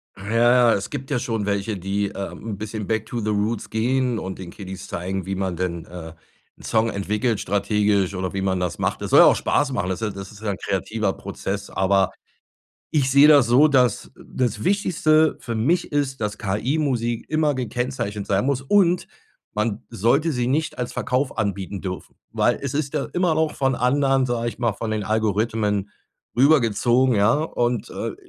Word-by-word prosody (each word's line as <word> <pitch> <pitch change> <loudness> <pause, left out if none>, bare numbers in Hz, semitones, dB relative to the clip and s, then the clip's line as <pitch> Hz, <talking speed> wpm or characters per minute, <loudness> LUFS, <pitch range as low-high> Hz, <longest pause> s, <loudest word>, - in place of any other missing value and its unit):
Ja, 100 +2 -7
ja, 120 0 +5
es 100 - -2
gibt 135 +3 -6
ja 130 - +1
schon 115 -4 -2
welche, 100 +1 -1
die, 100 +2 -1
äh, 100 -1 -5
'n 110 -3 -7
bisschen 105 -1 -5
back 110 -1 -1
to 120 - -4
the 110 -1 -2
roots 105 +2 -1
gehen 125 +2 0
und 95 0 -6
den 90 -2 -7
Kiddies 95 -1 -9
zeigen, 95 -1 -4
wie 95 0 -3
man 95 -2 -2
denn, 85 -1 -3
äh, 85 -2 -9 0.4
'n - - -17
Song 115 0 +1
entwickelt 105 +3 -1
strategisch 100 -1 +1
oder 95 -1 -3
wie 95 - -2
man 95 -1 0
das 90 -2 -3
macht. - - -1
Das - - -4
soll - - +7
ja - - +9
auch - - +6
Spaß 145 -1 0
machen, 90 -7 -1
das 95 - -3
ist 105 -3 -2
das 95 +1 -8
ist 105 0 -14
ja 110 - -2
'n 100 - -4
kreativer 100 +1 -2
Prozess, 100 +1 -5
aber 95 0 +2 0.8
ich 140 -4 +1
sehe 140 +2 +7
das 145 -4 +7
so, 130 +6 +5
das 125 -5 +2
das 125 -4 -3
Wichtigste 160 -5 +2
für 115 - -5
mich 145 +13 0
ist, 140 -2 -1
dass 105 0 -3
KI 110 +7 -1
Musik 120 -6 -1
immer 155 -1 +1
gekennzeichnet 120 -4 -3
sein 100 +5 +1
muss 135 -2 0
und 180 +3 +3 0.5
man 105 0 -2
sollte 140 - +2
sie 125 -3 -1
nicht 150 +5 -1
als 125 -1 -3
Verkauf 130 +2 -1
anbieten 100 -2 -2
dürfen. 90 -1 -6 0.2
Weil - - +1
es 140 -2 -3
ist 140 -1 -1
ja 145 - -1
immer 180 -2 +2
noch 155 -1 0
von 135 -1 +1
anderen, 135 +2 +2
sage 120 -1 -1
ich - - -8
mal, 120 -2 +1
von 110 +1 -4
den 110 -1 -1
Algorithmen 105 -1 0 0.5
rüber 140 +4 +6
gezogen, 120 +3 +2
ja? 105 +2 +4
Und, 120 -6 -1
äh, - - -4
115 Hz, 195 wpm, -23 LUFS, 100-130 Hz, 0.8 s, ja